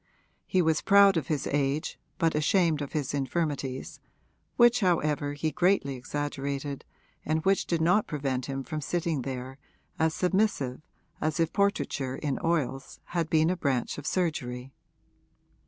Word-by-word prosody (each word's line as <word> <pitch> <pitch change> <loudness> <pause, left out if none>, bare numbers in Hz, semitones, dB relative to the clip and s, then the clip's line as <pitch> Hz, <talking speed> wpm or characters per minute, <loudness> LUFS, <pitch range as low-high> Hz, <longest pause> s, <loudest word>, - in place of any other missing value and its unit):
He 185 -1 +2
was 160 -1 +2
proud 200 -1 +6
of 155 -6 -1
his 150 -3 -1
age 145 +2 -1 0.2
but 165 -2 +2
ashamed 155 0 +2
of 145 - -5
his 145 -4 -2
infirmities, 140 -2 -2 0.6
which 240 0 +6
however 150 - +1
he 155 +2 -2
greatly 175 -4 +2
exaggerated 140 +1 -4 0.4
and 155 +1 -1
which 195 -1 +2
did 170 -2 0
not 180 +6 +3
prevent 135 -4 -2
him 135 0 -3
from 155 +4 -4
sitting 165 0 -1
there 130 +1 -6 0.4
as 160 0 +2
submissive 180 -9 0 0.4
as 155 +2 -1
if 165 -1 +1
portraiture 200 -10 0
in 140 -1 -2
oils 135 -5 -1
had 170 -2 0
been 160 +1 +3
a - - 0
branch 140 -6 -1
of 145 - -7
surgery. 135 -7 -2
150 Hz, 145 wpm, -28 LUFS, 135-170 Hz, 0.6 s, proud